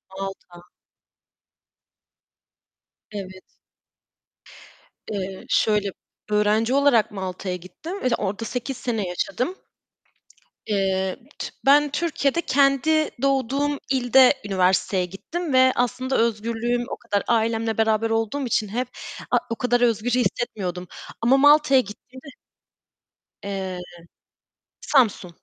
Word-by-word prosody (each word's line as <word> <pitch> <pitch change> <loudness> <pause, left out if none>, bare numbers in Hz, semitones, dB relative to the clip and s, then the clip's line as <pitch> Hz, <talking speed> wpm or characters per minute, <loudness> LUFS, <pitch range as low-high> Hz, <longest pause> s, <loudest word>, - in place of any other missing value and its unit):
Malta. 190 -2 -8 2.5
Evet. 190 -2 -7 1.7
Eee, 190 -2 -5
şöyle, 210 -2 +2 0.4
öğrenci 210 +3 +2
olarak 280 -5 +3
Malta'ya 185 -1 -4
gittim 315 - -8
ve - - +2
orada 205 +2 -3
8 250 +3 -4
sene 225 -5 -2
yaşadım. 200 - -2 1.1
Eee, 190 -2 0 0.2
t - - -4 0.2
ben 290 +1 +5
Türkiye'de 300 0 0
kendi 280 +3 +2
doğduğum 275 +1 +1
ilde 260 +1 +5
üniversiteye 190 -1 +1
gittim. 300 - -5
Ve 260 0 +5
aslında 255 +2 0
özgürlüğüm 230 +2 0
o - - -5
kadar 205 -3 -2
ailemle 225 -1 +1
beraber 220 0 +2
olduğum 225 +5 -1
için 220 -3 0
hep 245 +4 -2 0.4
a - - +4
o 230 - -2
kadar 245 0 +1
özgür 235 -1 +1
hissetmiyordum 205 -7 -1 0.3
ama 240 +4 +4
Malta'ya 290 -1 +6
gittiğimde 255 +5 -11 1.2
Eee, 190 -2 -4 1.0
Samsun. 235 -9 +2
230 Hz, 100 wpm, -23 LUFS, 200-260 Hz, 2.5 s, Malta'ya